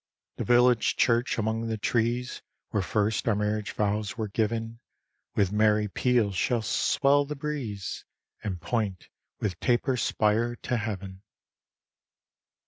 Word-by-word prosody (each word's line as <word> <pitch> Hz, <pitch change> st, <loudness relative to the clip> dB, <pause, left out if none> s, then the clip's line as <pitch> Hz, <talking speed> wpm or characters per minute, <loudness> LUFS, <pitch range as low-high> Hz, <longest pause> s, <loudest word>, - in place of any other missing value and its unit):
The -, -, -2 dB
village 120 Hz, -1 st, +4 dB
church, 120 Hz, 0 st, +2 dB
among 110 Hz, +1 st, -1 dB
the 110 Hz, -1 st, -2 dB
trees, 120 Hz, +3 st, -1 dB, 0.3 s
Where 105 Hz, -, +1 dB
first 105 Hz, +4 st, 0 dB
our 115 Hz, -, +3 dB
marriage 105 Hz, 0 st, -1 dB
vows 105 Hz, +1 st, -1 dB
were 110 Hz, -2 st, -2 dB
giv'n, 115 Hz, +2 st, -2 dB, 0.6 s
With 100 Hz, -2 st, +2 dB
merry 105 Hz, 0 st, +3 dB
peals 115 Hz, -2 st, +1 dB
shall 115 Hz, +4 st, +1 dB
swell 140 Hz, +8 st, +3 dB
the 150 Hz, +1 st, -5 dB
breeze, 135 Hz, -9 st, -4 dB, 0.4 s
And 95 Hz, -5 st, -3 dB
point 105 Hz, -2 st, -2 dB, 0.3 s
with 95 Hz, -5 st, -2 dB
taper 125 Hz, +1 st, +1 dB
spire 115 Hz, +1 st, +1 dB
to 125 Hz, -, -2 dB
heav'n. 100 Hz, -3 st, -5 dB
110 Hz, 130 wpm, -27 LUFS, 105-120 Hz, 0.6 s, village